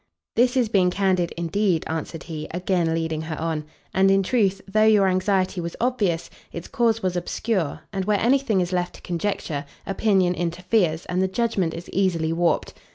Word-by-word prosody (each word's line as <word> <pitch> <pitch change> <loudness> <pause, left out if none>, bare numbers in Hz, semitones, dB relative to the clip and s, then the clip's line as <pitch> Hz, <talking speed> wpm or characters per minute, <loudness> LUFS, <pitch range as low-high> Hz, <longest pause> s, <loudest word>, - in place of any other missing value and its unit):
"This 245 +2 +3
is 245 -3 +3
being 190 -4 +3
candid 185 -2 +1
indeed," 170 0 +1
answered 160 0 -4
he, 155 -2 -6
again 175 -2 0
leading 160 -1 -2
her 160 0 -5
on: 160 -2 -2 0.3
"and 195 +1 +4
in 195 0 +4
truth, 195 -3 +1
though 215 +2 +2
your 210 -3 +5
anxiety 185 0 +1
was 170 0 -5
obvious, 210 -9 0 0.2
its 170 - -7
cause 230 -2 +1
was 185 -1 0
obscure, 180 -1 -2
and 190 -1 -2
where 210 -1 +2
any 255 +5 +4
thing 220 -8 +1
is 180 +1 -2
left 175 -1 -1
to - - -14
conjecture, 170 -4 -2 0.2
opinion 195 -2 +2
interferes, 175 0 0
and 180 +1 -1
the 190 - +2
judgment 190 -5 0
is 170 +1 -8
easily 170 -4 +1
warped. 170 0 +1
185 Hz, 180 wpm, -24 LUFS, 170-205 Hz, 0.3 s, your